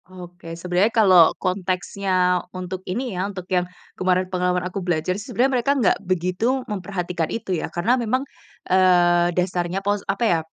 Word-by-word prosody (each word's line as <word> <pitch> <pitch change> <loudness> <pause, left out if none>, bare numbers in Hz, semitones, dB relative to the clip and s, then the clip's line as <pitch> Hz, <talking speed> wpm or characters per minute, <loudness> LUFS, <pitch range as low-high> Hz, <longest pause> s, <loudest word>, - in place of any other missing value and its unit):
Oke, 175 -2 -10
sebenarnya 180 +4 +1
kalau 190 -8 +6
konteksnya 185 -1 0 0.2
untuk 185 0 -5
ini 240 +4 -3
ya, 185 +2 -2
untuk 185 -3 -7
yang 180 0 +1 0.2
kemarin 185 0 +1
pengalaman 180 0 0
aku 185 +2 -4
belajar 175 -1 -1
sih, 205 +3 -8
sebenarnya 265 +3 +1
mereka 275 - +1
nggak 235 -8 +3
begitu 185 +8 -1
memperhatikan 180 -4 -3
itu 210 -4 -3
ya. - - -4
Karena 175 +8 0
memang, 255 +4 0 0.4
eee, 175 -2 +4
dasarnya, 180 +1 -1
pos 205 0 +1
apa 195 +4 0
ya, 175 -7 +3
185 Hz, 160 wpm, -22 LUFS, 180-200 Hz, 0.4 s, kalau